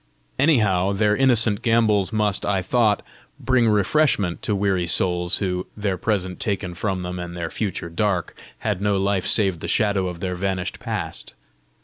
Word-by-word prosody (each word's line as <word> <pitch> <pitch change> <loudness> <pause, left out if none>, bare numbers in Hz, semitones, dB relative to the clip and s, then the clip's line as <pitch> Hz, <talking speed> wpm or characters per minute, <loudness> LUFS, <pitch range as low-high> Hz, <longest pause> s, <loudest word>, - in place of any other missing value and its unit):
Anyhow, 105 - +3
their 105 +1 +2
innocent 115 -5 +3
gambols 110 -4 +2
must, 105 -3 +1
I 95 -2 0
thought, 110 +1 +2 0.4
bring 125 -3 +2
refreshment 105 - +1
to 105 - -1
weary 95 -3 0
souls 90 +2 +2
who, 90 -2 -2
their 100 -2 -1
present 95 -1 -2
taken 95 -4 -2
from 95 +1 -3
them 90 0 -5
and 85 0 -6
their 85 -1 -4
future 95 -5 -3
dark, 95 -1 -1 0.3
had 105 -4 -2
no 100 -1 +1
life 95 -1 0
save 95 -5 +2
the - - -5
shadow 100 -3 +1
of 90 -1 -6
their 90 0 -3
vanished 95 0 -3
past. - - -4
100 Hz, 160 wpm, -22 LUFS, 90-105 Hz, 0.4 s, Anyhow